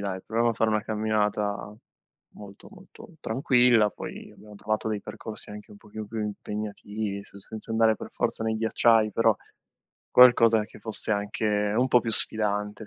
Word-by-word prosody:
dai, 95 -2 -4
proviamo 115 +2 +1
a - - -3
fare 110 0 +1
una 105 0 +1
camminata 105 -1 -1 0.6
molto, 100 -1 -13
molto 195 +4 -15
tranquilla." 120 -3 +3
Poi - - -9
abbiamo 105 0 -15
provato 110 +2 -2
dei 105 -2 -2
percorsi 110 +1 -7
anche 105 0 -10
un 105 - -13
pochino 105 0 -9
più 110 +1 -6
impegnativi, 105 0 -5
se 100 - -13
senza 110 +3 -10
andare 110 -1 +3
per - - -8
forza - - -2
nei 110 0 0
ghiacciai, 110 -1 +3
però 115 -2 +3 0.8
qualcosa 115 -3 +6
che - - -15
fosse 110 -1 -3
anche 105 +1 -2 0.3
un 125 +2 +2
po' 125 - +5
più 115 -1 -3
sfidante, 105 0 0
110 Hz, 165 wpm, -26 LUFS, 105-115 Hz, 0.8 s, qualcosa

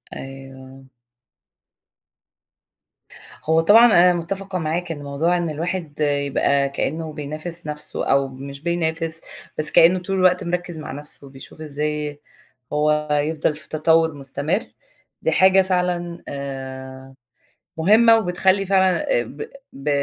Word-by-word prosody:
أيوه. 135 0 -11 2.6
هو 160 +1 +3
طبعًا 210 +8 +7
أنا 180 -6 +6
مُتفقة 190 +3 -4
معاك 165 +2 -2
إن 145 -3 -6
موضوع 150 +5 0
إن 170 -1 -2
الواحد 165 0 -4
يبقى 140 -1 +1
كأنّه 155 +3 -3
بينافس 155 +3 -4
نفْسُه 150 0 -3
أو 135 0 +3
مش 140 +1 -9
بينافس، 165 -1 -2 0.4
بس 155 - 0
كأنّه 175 +3 +6
طول 195 +2 -3
الوقت 185 -1 +3
مركِّز 175 -1 -3
مع 155 - -7
نفْسه 140 0 -6
بيشوف 135 +3 -12
إزاي 150 0 -3 0.5
هو 150 0 +1
يفضل 150 +1 0
في 155 - -11
تطوّر 160 +1 +2
مستمر، 145 +7 -2 0.6
دي - - +1
حاجة 190 +1 +5
فعلًا 180 -2 -1
آآ، 135 -1 -7 0.6
مهمّة 225 +7 +6
وبتخلّي 190 -1 +1
فعلًا 190 -1 +2 0.2
ب - - -10 0.3
ب 140 +2 -4
155 Hz, 120 wpm, -21 LUFS, 140-175 Hz, 2.6 s, طبعًا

